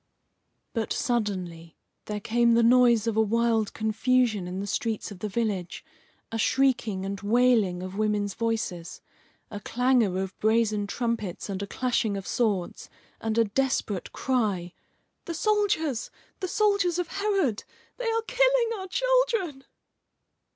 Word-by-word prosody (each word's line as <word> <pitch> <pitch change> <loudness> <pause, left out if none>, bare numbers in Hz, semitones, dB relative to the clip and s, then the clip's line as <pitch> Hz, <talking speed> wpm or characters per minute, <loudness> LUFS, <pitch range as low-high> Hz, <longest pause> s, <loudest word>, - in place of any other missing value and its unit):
But 225 -2 -2
suddenly 185 -9 -2 0.3
there 210 0 -4
came 235 +2 +2
the 235 - +4
noise 240 -2 +5
of 230 -2 -1
a 220 - +4
wild 225 0 +1
confusion 220 -2 +1
in 180 +1 -4
the 200 - -3
streets 220 +1 -2
of 195 - -9
the 210 - -3
village, 200 -5 -3 0.5
a 225 - -3
shrieking 230 -7 +1
and 195 0 -4
wailing 215 -5 +2
of 185 +2 -6
women's 210 -2 0
voices, 220 -7 -3 0.5
a 205 - -5
clangour 240 -3 +1
of 190 0 -7
brazen 215 -2 +2
trumpets 225 -4 -3
and 195 0 -3
a 200 - -4
clashing 235 -2 0
of 195 - -6
swords, 205 -7 -1 0.3
and 225 0 -2
a 230 - +6
desperate 215 -4 -1
cry: 205 -9 -1 0.5
"The 335 - -4
soldiers! 355 - 0 0.3
the 370 - -2
soldiers 400 -3 +2
of 355 -2 -1
Herod! 390 - 0 0.3
They - - -2
are 450 0 0
killing - - +2
our 380 - -6
children." 460 - +1
225 Hz, 140 wpm, -27 LUFS, 205-265 Hz, 0.5 s, a